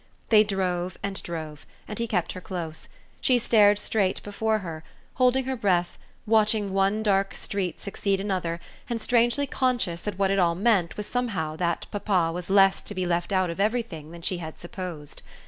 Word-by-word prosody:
They 215 -2 +7
drove 185 -3 -2
and 200 -1 -3
drove, 155 -3 -6 0.2
and 210 - -5
he 235 - 0
kept 185 -7 0
her 185 - -7
close; 165 -4 -6 0.3
she 255 - +4
stared 210 -3 +5
straight 205 -2 0
before 220 +2 0
her, 160 -2 -6 0.3
holding 255 +1 +4
her 265 0 -1
breath, 180 -6 0 0.3
watching 215 -2 +2
one 195 +3 +2
dark 195 -2 +2
street 190 -4 -3
succeed 200 -1 -1
another 185 -4 -2 0.3
and 235 -1 -1
strangely 240 +4 +2
conscious 245 -11 0
that 205 -3 -4
what 195 -1 +2
it 195 - +2
all 170 -2 +3
meant 195 -4 +2
was 210 - -2
somehow 205 -12 -2
that 170 -1 -1
papa 195 -5 +1
was 180 +1 -6
less 195 0 +5
to 205 - -7
be 185 -1 -1
left 175 +2 -1
out 185 -3 +2
of 170 - -8
everything 210 -8 -1
than 170 0 -11
she 180 0 0
had 160 -2 -7
supposed. 175 -4 -7
195 Hz, 180 wpm, -26 LUFS, 175-215 Hz, 0.3 s, They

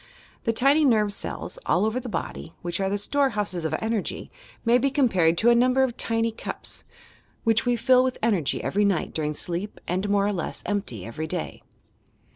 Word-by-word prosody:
The 230 - +3
tiny 275 +7 +4
nerve 215 -6 +3
cells, - - -4
all 190 - +3
over 220 +3 0
the 250 - -7
body, 170 -3 -5
which 175 +1 -2
are 195 0 0
the 200 - 0
storehouses 210 - 0
of 160 - -1
enei^y, 220 -2 -2 0.3
may 235 +2 +5
be 275 - +2
compared 190 - +3
to 235 +5 +5
a - - +7
number 255 +2 +4
of 245 -3 -1
tiny 230 -1 0
cups, 225 - -4 0.6
which 225 +1 +2
we 245 - +3
fill 255 +2 +4
with 255 -1 -1
energy 200 -11 +1
every 205 +2 +1
night 195 -5 0
during 150 -1 -2
sleep 180 +7 -3
and 185 +3 -1
more 200 0 +3
or 205 - 0
less 175 -4 -4
empty 195 - -3
every 155 +8 -5
day. 75 - -4
210 Hz, 190 wpm, -25 LUFS, 180-245 Hz, 0.6 s, a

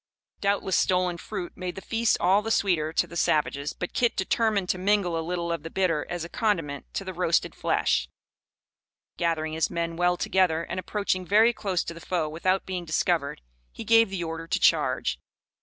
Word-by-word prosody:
Doubtless 200 -1 0
stolen 180 -1 +2
fruit 180 0 -6
made 180 -1 -5
the - - -6
feast 225 +2 +1
all 190 +4 +4
the 225 - -4
sweeter 175 -8 +1
to 165 - +1
the 170 0 -12
savages, 150 -3 +1
but 180 - -5
Kit 240 -1 +1
determined 205 0 +1
to 185 - 0
mingle 195 -3 +1
a 165 - -1
little 170 +1 -3
of 170 - -2
the 165 - -7
bitter 165 -4 0
as 175 -1 -3
a - - -6
condiment 165 - -2
to - - -3
the - - -5
roasted - - +1
flesh. - - 0 1.1
Gathering 160 -2 -1
his 160 -1 0
men 170 0 -2
well 175 0 +2
together, 175 -4 +1
and 185 - -4
approaching 185 0 -1
very 215 +6 +4
close 190 -6 -1
to 170 - -6
the 165 - -11
foe 170 -3 -1
without 185 +5 0
being 185 -2 -4
discovered, 160 - 0 0.3
he - - -8
gave 230 -2 +5
the 190 -3 -3
order 165 0 -5
to - - 0
charge. - - +2
175 Hz, 190 wpm, -26 LUFS, 165-195 Hz, 1.1 s, gave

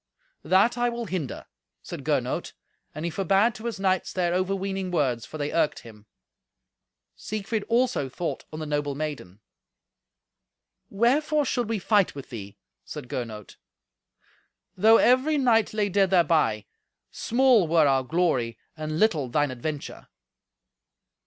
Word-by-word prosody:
"That 220 +6 +3
I 240 0 +2
will 235 0 -4
hinder," 170 - -4 0.4
said - - -7
Gernot, - - -1 0.4
and 155 - -4
he 170 - -2
forbade 195 +6 +2
to 220 - -10
his 230 -4 -3
knights 190 -2 0
their 175 -2 0
overweening 190 +1 -1
words, 130 -10 0
for 155 - -8
they 145 0 -3
irked 165 -3 +1
him. 110 -2 -15 1.1
Siegfried 215 0 -3
also 235 - +1
thought 170 +6 -4
on 155 - -7
the 155 - -4
noble 145 -1 -2
maiden. 140 -10 -6 1.5
"Wherefore 290 +8 +2
should 245 -4 -1
we 225 - 0
fight 205 -2 +2
with 140 - -9
thee?" 100 -4 -8 0.3
said 125 - -8
Gernot. 110 -4 -6 1.2
"Though 220 +4 +6
every 260 +5 +3
knight 235 -5 +3
lay 215 -1 0
dead 195 0 +2
thereby, 155 - +2 0.5
small 240 -6 +3
were 160 -1 +4
our 135 -2 +3
glory 130 -6 0 0.2
and 155 0 -4
little 160 - +2
thine 145 +2 +1
adventure." 145 +4 -6
180 Hz, 135 wpm, -26 LUFS, 145-220 Hz, 1.5 s, Though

